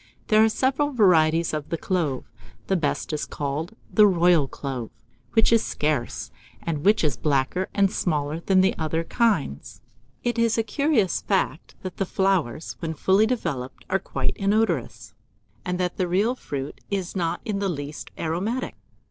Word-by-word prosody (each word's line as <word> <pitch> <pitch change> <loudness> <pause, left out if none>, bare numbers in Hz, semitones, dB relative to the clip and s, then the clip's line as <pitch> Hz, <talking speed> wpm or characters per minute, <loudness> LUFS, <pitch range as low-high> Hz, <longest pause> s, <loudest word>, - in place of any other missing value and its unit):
There 215 0 +6
are 220 - +5
several 265 +5 +1
varieties 170 - +4
of 150 -1 -3
the 165 - -1
clove; 160 -8 -1 0.4
the 190 - +1
best 155 -2 -1
is 150 - -2
called 150 +8 -4 0.2
the 210 -1 +7
royal 175 -5 +4
clove, 130 -5 -5 0.4
which 225 0 +4
is 230 - +4
scarce, 150 -5 -2 0.3
and 150 -3 -3
which 210 0 +4
is 145 -5 +1
blacker 145 +5 0
and 195 -1 +3
smaller 150 -2 -1
than 185 +2 +3
the 190 - +2
other 160 +1 -1
kinds. 165 - -1 0.4
It 240 -1 0
is 230 0 +2
a 225 - +2
curious 230 - +1
fact, 185 -6 -1
that 185 -2 -6
the 195 - -1
flowers, 180 -9 0
when 160 -1 -3
fully 195 +7 +3
developed, 155 - -3
are 195 - +3
quite - - -2
inodorous, 210 +3 0 0.5
and 180 0 -2
that 180 -1 -1
the 185 - 0
real 200 +7 +2
fruit 140 - -6
is 195 -2 -3
not 170 -2 -1
in 210 -3 -2
the 200 -1 0
least 145 -2 -5
aromatic. 195 +11 -2
180 Hz, 165 wpm, -24 LUFS, 155-210 Hz, 0.5 s, the